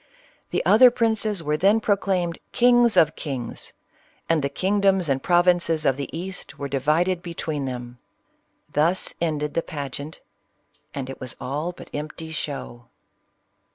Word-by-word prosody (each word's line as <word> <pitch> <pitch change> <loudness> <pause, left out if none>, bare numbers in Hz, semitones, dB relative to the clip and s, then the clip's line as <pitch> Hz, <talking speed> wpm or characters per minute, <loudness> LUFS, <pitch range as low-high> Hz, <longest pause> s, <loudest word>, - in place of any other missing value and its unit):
The - - -1
other 250 +4 +8
princes 220 -5 0
were 150 0 0
then 200 +6 +4
proclaimed 190 -5 0
" - - -46
kings 240 -1 +5
of 155 -1 +5
kings 130 -6 -5 0.3
;" - - -35
and 165 -2 +3
the 140 - -1
kingdoms 195 +2 +1
and 135 -2 0
provinces 175 -2 +3
of 135 - +3
the 140 0 -5
East 180 +3 -5
were 140 - -4
divided 155 +7 +1
between 160 -4 -4
them. 125 -1 -6 0.7
Thus 165 +5 +1
ended 150 -3 -1
the 165 - +1
pageant, 145 0 -6 0.4
— - - -41
and 135 -2 -4
it 135 - -8
was 130 -2 -5
all 150 +6 -3
but 180 - -12
empty 155 +2 -6
show. 135 -6 -5
160 Hz, 155 wpm, -24 LUFS, 140-185 Hz, 0.7 s, other